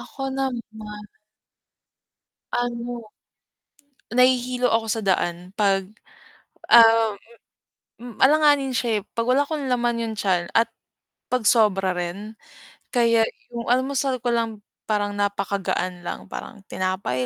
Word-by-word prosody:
Ako 270 - -9
naman 265 -3 -2 1.9
Ano, 240 -1 -3 1.1
nahihilo 250 0 +3
ako 225 0 +1
sa 225 - 0
daan 180 -2 -1
'pag 195 -2 +2 0.8
um, 225 -2 +7 0.9
hmm 240 -2 -10
alanganin 290 -2 +4
siya 230 -3 0
eh. - - -15
'Pag 230 - 0
wala 260 +3 +4
akong 290 -3 -3
laman 240 -1 0
yung 225 -1 -3
tiyan 180 -4 0
at 230 0 +4 0.6
pag 250 -2 0
sobra 195 -5 +3
rin, 185 +5 -5 0.6
kaya 230 -2 +4 0.3
yung 235 -1 -5
almusal 260 0 +1
ko 245 - +1
lang 225 -2 -2 0.3
parang 205 -1 0
napakagaan 195 -3 -2
lang, - - -5
parang 205 - -8
tinapay 185 -10 -2
230 Hz, 115 wpm, -23 LUFS, 200-250 Hz, 1.9 s, um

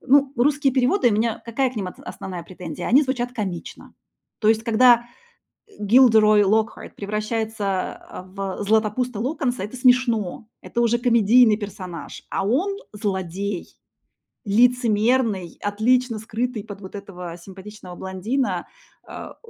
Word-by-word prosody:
ну, 275 +1 +4
русские 275 +2 +2
переводы, 260 +3 +3
у - - +1
меня 225 +1 0
какая 245 +3 0
к 250 - -14
ним 195 - -2
отс - - -12
основная 180 -3 -7
претензия? 175 -2 -7
Они 270 +6 +6
звучат 250 -3 -2
комично. 195 -8 -6 0.5
То 215 - +2
есть 220 0 +3
когда 240 +1 +5 0.8
Gilderoy 215 -1 +5
Lockhart 220 +3 0
превращается, 210 -1 -3
э, - - -7
в 195 +1 -5
Златопуста 220 +2 0
Локонса, 255 -3 -2
это 210 +6 -6
смешно, 240 -6 +2
это 235 - -2
уже 235 0 +2
комедийный 235 -1 +5
персонаж. 190 -5 -8
А 195 - -2
он- 365 - 0 0.2
злодей, 195 -2 -4 0.7
лицемерный, 225 -3 +2
отлично 230 +3 +1
скрытый 225 +1 -3
под 205 -1 -9
вот 190 -2 -11
этого 180 -4 -8
симпатичного 190 +1 -11
блондина, 190 +9 -2 0.4
а, - - -9
220 Hz, 130 wpm, -22 LUFS, 200-245 Hz, 0.8 s, Они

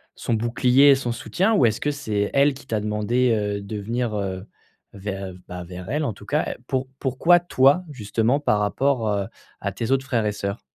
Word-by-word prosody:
son 115 - -1
bouclier 125 +5 +4
et - - +7
son 125 -3 -3
soutien, 195 - 0
ou 125 - +4
est-ce 110 -1 +1
que 145 - 0
c'est 110 -8 -1
elle 140 0 +4
qui 135 - -14
t'a 110 -2 -1
demandé, 105 +4 +1
heu, 105 -1 -1
de 105 +2 -6
venir, 115 +1 -2
heu, 95 -1 -3 0.5
ver 95 -1 -5
bah, 90 0 -6
vers 90 +2 -9
elle 150 +3 0
en 120 - -1
tout - - -14
cas? - - 0
Pour 130 0 -1
pourquoi 155 +7 +4
toi 145 0 +3
justement 115 +1 0
par 105 -7 +1
rapport, 120 +3 +1
heu, 100 -1 0 0.3
à 100 - -3
tes 110 +5 -4
autres 135 0 +2
frères 120 -6 0
et - - +1
sœurs? 100 +1 -4
115 Hz, 205 wpm, -23 LUFS, 105-135 Hz, 0.5 s, et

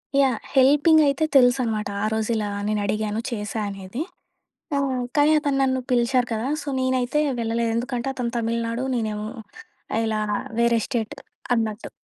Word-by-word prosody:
Yeah! 270 -4 +3 0.2
హెల్పింగయితే 290 +2 +5
తెలుసనమాట, 245 -5 +3 0.2
ఆ - - +2
రోజిలా 220 -1 -1 0.2
నేనుడిగాను, 215 0 -1
చేశా 215 0 -3
అనేది. 195 +6 -6 0.7
ఆ! - - +2 0.4
కానీ 295 +1 +5
అతను 285 -2 0
నన్ను 260 -1 +1
పిలిచారు 245 +1 +2
కదా! 225 +4 -2
సో, - - -11
నేనైతే 260 +2 +1 0.2
వెళ్ళలేదు. 230 0 0
ఎందుకంటే, 245 +1 -2
అతను 240 -2 -2
తమిళనాడు, 230 +2 -1
నేనేమో 215 -2 -2 0.7
ఆహ్, 225 - +2
ఇలా 215 -1 0 0.4
వేరే 235 -1 +3
స్టేట్ 225 -3 -2 0.4
అన్నట్టు. 220 -1 -2
235 Hz, 130 wpm, -23 LUFS, 220-260 Hz, 0.7 s, హెల్పింగయితే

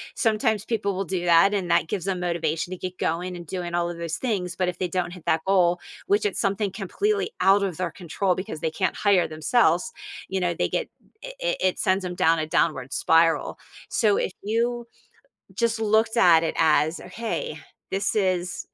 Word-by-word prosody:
Sometimes 220 -2 +1
people 200 -4 -1
will 195 +1 -2
do 180 0 -3
that, 175 +4 +5
and 185 -4 -1
that 160 - +3
gives 190 -2 -3
them 185 -2 -2
motivation 170 0 -1
to 185 - -4
get 180 0 -6
going 180 +2 -2
and 175 -1 -8
doing 175 0 -4
all 175 0 +1
of 175 - -6
those 170 -1 -3
things, 190 -8 -2
but 185 -1 0
if 175 - -7
they 180 - 0
don't 175 0 -2
hit 180 - -12
that 160 0 +1
goal, 180 -2 +3 0.3
which 205 +1 +2
is 205 - -1
something 200 0 0
completely 405 - -1
out 195 +1 +5
of 185 -4 -2
their 180 -3 -2
control 180 +1 -1
because 185 -5 -6
they 160 - -1
can't 185 +4 -1
hire 200 -4 +3
themselves, 175 +5 +2 0.4
you 190 - -1
know, 175 -1 0
they - - 0
get - - -2 0.3
it - - -8
it - - -1
it 185 -1 +1
sends 190 +1 +1
'em 180 - -4
down 165 -1 +3
a 155 - -2
downward 140 -4 0
spiral. 165 0 +2 0.3
So 210 -3 +2
if - - -1
you 235 +3 -1 0.7
just 230 -1 0
looked 220 +1 +2
at 170 -6 +6
it 165 - -2
as 160 0 +3
a, - - -11
"Hey, 220 -8 -4 0.3
this 195 +1 -1
is" 185 -3 -1
185 Hz, 205 wpm, -24 LUFS, 170-210 Hz, 0.7 s, at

